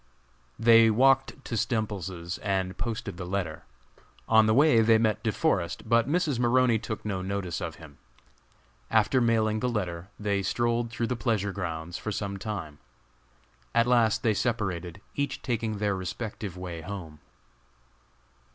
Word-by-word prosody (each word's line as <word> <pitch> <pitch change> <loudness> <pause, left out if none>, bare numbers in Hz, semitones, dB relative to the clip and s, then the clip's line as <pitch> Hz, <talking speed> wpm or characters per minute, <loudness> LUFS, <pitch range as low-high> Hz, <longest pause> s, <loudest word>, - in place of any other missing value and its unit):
They 115 0 +6
walked 135 +4 +3
to 115 - -3
Stemples's 95 -7 -2
and 95 -2 -1
posted 110 -5 -4
the 90 - -5
letter. 90 -5 -3 0.6
On 110 -1 +5
the 110 - +4
way 140 -4 +6
they 115 0 +5
met 110 -2 +1
De 110 - 0
Forest, 100 - -1
but 115 +2 +3
Mrs. 155 -6 +1
Maroney 120 -1 +3
took 110 0 -6
no 95 -3 -2
notice 95 -2 -3
of 85 -2 -4
him. 75 -4 -14 0.9
After 110 +4 +3
mailing 110 -2 +2
the 125 - 0
letter, 90 -6 -3
they 100 -2 0
strolled 120 +3 0
through 115 0 -2
the 125 - -1
pleasure 105 -3 0
grounds 85 -3 -5
for 110 - -4
some 100 -1 -3
time. 95 -8 -6 1.0
At 115 0 +5
last 120 -1 +3
they 110 -3 +3
separated, 95 -6 -2
each 140 -1 -3
taking 115 -4 -2
their 100 -1 0
respective 95 0 -5
way 90 -2 -6
home. 80 -4 -7
110 Hz, 150 wpm, -28 LUFS, 95-115 Hz, 1.0 s, They